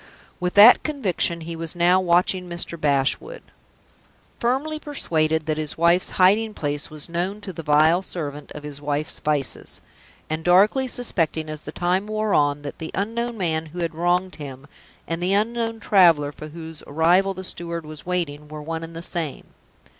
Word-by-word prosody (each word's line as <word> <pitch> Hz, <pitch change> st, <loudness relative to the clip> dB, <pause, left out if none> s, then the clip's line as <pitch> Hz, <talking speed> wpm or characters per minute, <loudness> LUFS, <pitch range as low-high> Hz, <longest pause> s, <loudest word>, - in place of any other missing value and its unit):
With 180 Hz, 0 st, -2 dB
that 210 Hz, +4 st, +9 dB
conviction 195 Hz, -, -1 dB
he 165 Hz, +1 st, -6 dB
was 165 Hz, +1 st, -4 dB
now 175 Hz, +2 st, +4 dB
watching 180 Hz, 0 st, +2 dB
Mr. 170 Hz, 0 st, -3 dB
Bashwood, 145 Hz, -, 0 dB, 1.0 s
firmly 275 Hz, +6 st, 0 dB
persuaded 160 Hz, -, 0 dB
that 155 Hz, 0 st, -1 dB
his 155 Hz, -2 st, -3 dB
wife's 170 Hz, +2 st, +3 dB
hiding 210 Hz, +4 st, +4 dB
place 145 Hz, 0 st, -3 dB
was 155 Hz, -1 st, -3 dB
known 180 Hz, +4 st, -2 dB
to 195 Hz, -2 st, -7 dB
the 165 Hz, -, -6 dB
vile 155 Hz, +3 st, +4 dB
servant 150 Hz, -6 st, -6 dB
of 150 Hz, -, -9 dB
his 145 Hz, -1 st, -8 dB
wife's 145 Hz, +1 st, -1 dB
vices; 150 Hz, -3 st, -1 dB, 0.5 s
and 155 Hz, +1 st, -3 dB
darkly 205 Hz, +10 st, +4 dB
suspecting, 165 Hz, -11 st, -1 dB
as 155 Hz, -1 st, -7 dB
the -, -, -8 dB
time 185 Hz, +3 st, 0 dB
wore 215 Hz, -1 st, -1 dB
on, 145 Hz, 0 st, +2 dB
that 145 Hz, -, -7 dB
the 160 Hz, -, -5 dB
unknown 230 Hz, +4 st, -2 dB
man 160 Hz, -4 st, -1 dB
who 160 Hz, +3 st, -12 dB
had 170 Hz, 0 st, -2 dB
wronged 175 Hz, +3 st, 0 dB
him, 140 Hz, -3 st, -8 dB, 0.4 s
and 165 Hz, +1 st, -3 dB
the 185 Hz, +2 st, +1 dB
unknown 225 Hz, +2 st, 0 dB
traveler 170 Hz, -9 st, +4 dB
for 155 Hz, -, -9 dB
whose 160 Hz, 0 st, -9 dB
arrival 175 Hz, +6 st, +3 dB
the 185 Hz, -, -7 dB
steward 170 Hz, -2 st, -4 dB
was 155 Hz, -1 st, -9 dB
waiting, 160 Hz, -5 st, -3 dB
were 155 Hz, 0 st, -8 dB
one 160 Hz, +2 st, -5 dB
and 165 Hz, 0 st, -9 dB
the 165 Hz, -, -6 dB
same. 165 Hz, -5 st, -4 dB
170 Hz, 175 wpm, -23 LUFS, 155-190 Hz, 1.0 s, that